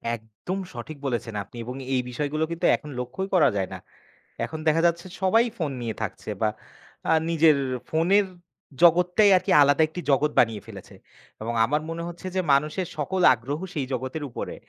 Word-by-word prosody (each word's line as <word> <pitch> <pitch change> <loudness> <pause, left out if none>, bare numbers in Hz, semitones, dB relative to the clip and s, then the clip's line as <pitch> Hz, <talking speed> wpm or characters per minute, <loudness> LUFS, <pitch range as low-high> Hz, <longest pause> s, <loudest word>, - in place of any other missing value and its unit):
একদম 110 - -7 0.2
সঠিক 135 +6 -7
বলেছেন 120 -3 -2
আপনি। 100 - -19
এবং 125 +2 -6 0.2
এই 130 - +2
বিষয়গুলো 150 +5 -2
কিন্তু 170 - -2
এখন 150 - -10
লক্ষ্যই 125 +11 -4
করা 170 - +5
যায় 95 -2 0
না। - - -5 0.7
এখন 160 - -7
দেখা 160 +1 +4
যাচ্ছে 170 +1 -2 0.2
সবাই 225 +5 +4
ফোন 155 -5 -2
নিয়ে 115 -2 -3
থাকছে 110 0 -5
বা 110 - +3 0.6
আ - - +6 0.2
নিজের, 160 -2 +5 0.3
ফোনের 185 +6 +3 0.6
জগতটাই 180 +4 +5
আরকি - - -2
আলাদা 145 +1 +4
একটি 175 +3 -6
জগৎ 145 +2 +2
বানিয়ে 115 -3 +2
ফেলেছে। 100 -4 -11 0.5
এবং 115 +2 -3
আমার 150 +5 0
মনে 165 +1 -4
হচ্ছে 175 +2 -8
যে, - - +2
মানুষের 150 +6 +1
সকল 185 +6 -1
আগ্রহ 130 +5 -4
সেই 145 -5 -2
জগতের 130 +4 -4
উপরে। - - -6
150 Hz, 170 wpm, -25 LUFS, 125-170 Hz, 0.7 s, আ